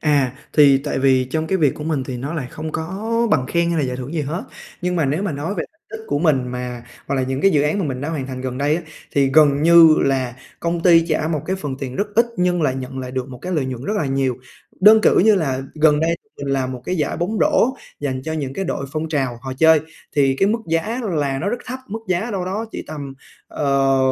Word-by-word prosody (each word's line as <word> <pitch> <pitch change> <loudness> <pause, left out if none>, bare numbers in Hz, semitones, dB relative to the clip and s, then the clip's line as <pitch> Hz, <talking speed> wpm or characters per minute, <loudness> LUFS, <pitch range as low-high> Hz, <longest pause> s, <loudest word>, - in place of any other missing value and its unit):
À, 145 -5 +2 0.2
thì 140 -3 +6
tại 145 0 -3
vì 130 -1 +3
trong 155 +5 -2
cái 190 +2 0
việc 145 -5 +2
của 150 - -7
mình 150 -5 -1
thì 130 -2 -5
nó 140 +7 -5
lại 140 -6 -3
không 155 0 -6
có 165 +5 -4 0.3
bằng 130 -4 +2
khen 170 +3 +1
hay 170 - 0
là 145 - +1
giải 125 - -3
thưởng 130 +5 -6
gì 160 - 0
hết, 155 +6 -4 0.4
nhưng 180 0 0
mà 160 - +2
nếu 150 +7 0
mà 200 - -1
nói 150 +8 -3
về - - -2 0.3
tích 225 - -7
của 145 - 0
mình 140 -6 +2
mà 125 -1 -5 0.2
hoặc 140 - -1
là 130 - +1
những 130 +1 -2
cái 195 - +5
dự 145 -5 +3
án 150 +7 0
mà 190 - 0
mình 130 -3 -3
đã 145 - -3
hoàn 145 -5 -3
thành 130 -1 -6
gần 130 0 -4
đây 145 +2 +2
á, 175 - -5 0.3
thì 135 -1 +2
gần 145 -2 +5
như 170 0 +8 0.2
là 130 -3 0 0.2
công 170 0 -1
ty 165 -2 +5
trả 155 0 0
một 155 -3 -1
cái 190 - -1
phần 145 -7 -5
tiền 130 -2 -5
rất 205 - 0
ít 235 +2 +4
nhưng 180 -2 +1
lại 130 -3 +1
nhận 130 0 -6
lại 130 -1 -5
được 130 0 -4
một 125 -1 -9
cái 180 +1 -4
lợi 150 -5 0
nhuận 130 0 -5
rất 210 - -1
là 155 - 0
nhiều. 135 -2 0 0.4
Đơn 215 +3 +8
cử - - +4
như 215 +3 +6
là 135 -7 -1
gần 150 -1 +4
đây 165 +1 +1 0.2
mình 140 - -6
làm 130 -1 -1
một 125 -1 -8
cái 185 - -2
giải 150 -3 -1
bóng 205 +6 -2
rổ 260 +4 +3 0.3
dành 130 -3 -3
cho 160 - -3
những 140 -4 -3
cái 195 - -2
đội 140 -5 -3
phong 155 +1 -2
trào 135 -6 -1
họ 130 -1 -5
chơi, 160 -1 +6 0.4
thì 135 -2 +3
cái 195 - +3
mức 225 +2 +1
giá 210 +10 -1
là 140 -3 0
nó 195 - -2
rất 240 - -1
thấp, 255 +1 -5
mức 215 +3 -4
giá 185 +6 0
đâu 190 -3 -2
đó 200 +5 -3
chỉ - - -5
tầm, 140 -3 -7 0.3
ờ, 135 -2 +1
150 Hz, 270 wpm, -20 LUFS, 135-170 Hz, 0.4 s, như